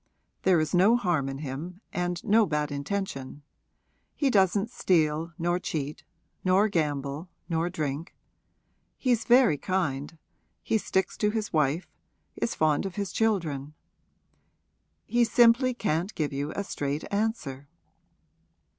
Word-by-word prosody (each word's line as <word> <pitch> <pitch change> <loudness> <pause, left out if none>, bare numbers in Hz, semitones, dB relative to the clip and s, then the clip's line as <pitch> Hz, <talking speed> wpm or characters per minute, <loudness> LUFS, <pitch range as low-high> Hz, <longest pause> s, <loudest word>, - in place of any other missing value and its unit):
There 185 -3 +4
is 155 -1 -1
no 190 +6 +5
harm 175 - 0
in 135 - -5
him 150 +6 -6
and 175 -1 -2
no 215 +1 +4
bad 150 -1 -1
intention; 145 -2 -4 0.7
he 280 -3 +1
doesn't 200 +2 +3
steal 160 -5 +1
nor 175 +1 0
cheat 150 -4 -4 0.4
nor 195 +3 +4
gamble 150 -1 -2 0.2
nor 165 0 0
drink; 155 -2 -4 0.8
he's 240 -4 +1
very 240 - +5
kind 165 -5 -2 0.5
he 220 - +1
sticks 190 -2 -1
to 210 - +2
his 215 -1 -3
wife, 155 +2 +1 0.5
is - - -2
fond 155 +3 +2
of 190 - -9
his 200 -2 -3
children. 155 -10 -1 1.3
He 240 0 +2
simply 235 +2 +5
can't 185 -3 -1
give 150 -3 -1
you 140 +2 -2
a 200 - -1
straight 145 -5 -3
answer.' 180 - -2
175 Hz, 130 wpm, -27 LUFS, 150-205 Hz, 1.3 s, no